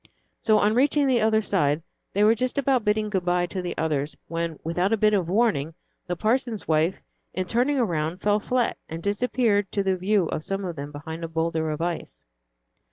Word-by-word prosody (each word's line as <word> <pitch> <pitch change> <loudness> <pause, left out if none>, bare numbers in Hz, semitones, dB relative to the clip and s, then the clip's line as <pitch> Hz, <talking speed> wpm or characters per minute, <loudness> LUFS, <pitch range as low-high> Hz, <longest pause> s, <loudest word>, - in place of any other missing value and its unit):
So, 215 -1 +4
on 210 +1 +3
reaching 280 +4 +3
the 255 -4 +3
other 220 0 +3
side, 150 -6 +1 0.3
they 205 - +2
were 215 +2 +6
just 255 +4 -2
about 270 -3 +2
bidding 210 0 0
good 190 -3 0
by 175 0 +1
to 185 +1 -4
the 180 - -5
others, 150 -2 -1
when, 165 -1 -3
without 175 +5 0
a 225 - +3
bit 215 0 +3
of 185 -5 +1
warning, 185 -8 +1 0.3
the 175 - -1
parson's 225 +2 -1
wife, 160 +3 +2 0.4
in 185 - -1
turning 250 +8 +1
around, 170 -7 -1
fell 205 +1 +2
flat, 245 +2 0
and 165 +1 -6
disappeared 205 -1 +1
to 200 - +1
the 190 -1 +1
view 190 +1 +1
of 155 - -3
some 195 +2 -2
of 175 -2 -4
them 145 0 -6
behind 160 +3 -7
a - - -2
boulder 160 0 -1
of 155 +1 -3
ice. 175 -1 -4
195 Hz, 205 wpm, -25 LUFS, 165-220 Hz, 0.4 s, were